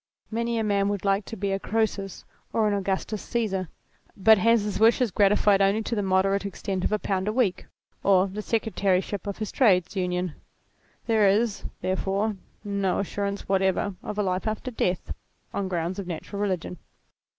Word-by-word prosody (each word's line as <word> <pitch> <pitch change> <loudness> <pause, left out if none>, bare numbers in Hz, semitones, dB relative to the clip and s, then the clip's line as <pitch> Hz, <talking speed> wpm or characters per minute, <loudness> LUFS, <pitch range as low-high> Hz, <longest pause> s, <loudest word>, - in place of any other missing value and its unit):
Many 235 +1 -1
a 225 - +1
man 200 -1 +1
would 205 -1 -3
like 195 +1 +2
to 225 - -7
be 200 0 -1
a 195 - 0
Croesus 205 -3 -2 0.3
or 220 -1 +2
an 205 - +1
Augustus 200 +1 -2
Caesar, 195 -7 -2 0.5
but 215 +2 +6
has 230 +1 +4
his 210 -2 -3
wishes 230 +1 +4
gratified 200 +1 +4
only 200 +3 +3
to 235 - -3
the 210 - +1
moderate 195 +1 +2
extent 195 -1 -3
of - - 0
a 215 - +2
pound 190 -1 -2
a - - +2
week 215 -6 0 0.3
or 190 -1 +4
the 200 +2 -5
Secretaryship 205 -3 0
of 200 - -3
his 215 -1 -4
Trades 185 -7 +3
Union. 180 -2 -1 0.7
There 220 -3 +4
is, 215 +1 +1 0.2
therefore, 195 +3 0 0.3
no 200 -2 0
assurance 200 0 -3
whatever 190 +1 +1
of 210 - -6
a 210 - +1
life 185 +2 -1
after 215 +4 -3
death, 185 -6 -1 0.4
on 200 - -1
grounds 175 +1 -2
of 195 - -5
natural 185 +4 -5
religion. 180 -4 -2
200 Hz, 175 wpm, -26 LUFS, 190-215 Hz, 0.7 s, but